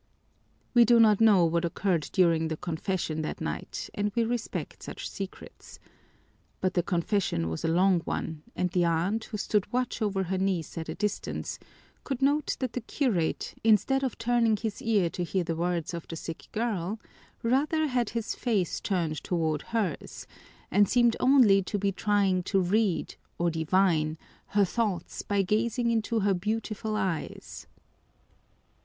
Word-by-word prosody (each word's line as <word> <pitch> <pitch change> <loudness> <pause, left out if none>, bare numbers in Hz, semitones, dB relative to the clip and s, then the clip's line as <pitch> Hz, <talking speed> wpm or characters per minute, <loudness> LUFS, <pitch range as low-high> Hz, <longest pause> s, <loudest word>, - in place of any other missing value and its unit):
We 240 -1 +7
do 235 +1 +5
not 215 -2 +5
know 205 -6 +6
what 170 +1 +1
occurred 170 -1 0
during 165 -4 +3
the 160 -1 -3
confession 165 -1 -2
that 155 - -4
night 75 - -4
and 205 0 -1
we 235 - +3
respect 235 0 -3
such - - -6
secrets. 195 -1 -9 0.8
But 185 0 0
the 175 - +2
confession 175 - 0
was 80 - -4
a - - +1
long 180 +2 +4
one 160 -1 -4
and 180 -1 0
the 180 -1 +2
aunt, 175 +7 0
who 215 - -5
stood 205 -1 0
watch 250 -1 -1
over 195 -3 0
her 190 +1 -2
niece 185 -5 -1
at 165 -1 -5
a - - -4
distance, 210 -1 -3 0.4
could 270 -3 -3
note 290 +2 +2
that 255 -3 -2
the 250 - -3
curate, 220 - -1
instead 225 +5 +4
of 260 - -2
turning 230 -1 +2
his 215 0 -4
ear 210 -6 +2
to 180 - -3
hear 180 +1 -1
the 165 -1 -2
words 170 0 -1
of 170 -1 -6
the 165 - -6
sick 165 0 -7
girl, 215 -3 -2 0.4
rather 290 +6 +2
had 250 -5 0
his 230 -2 -3
face 210 -8 -1
turned 170 -6 -1
toward 160 -4 0
hers, 210 -9 -3 0.5
and 205 +1 +4
seemed 240 -1 +4
only 250 -7 +6
to 205 +2 -3
be 200 0 0
trying 195 -2 +1
to 195 +2 +1
read, 190 +1 0 0.2
or 170 0 +1
divine, 160 -1 +1 0.3
her 205 -1 +3
thoughts 195 -4 -2
by 200 -1 0
gazing 235 +4 +1
into 225 0 0
her 200 0 +3
beautiful 215 +2 -2
eyes. 190 -6 -4
195 Hz, 160 wpm, -28 LUFS, 170-225 Hz, 0.8 s, We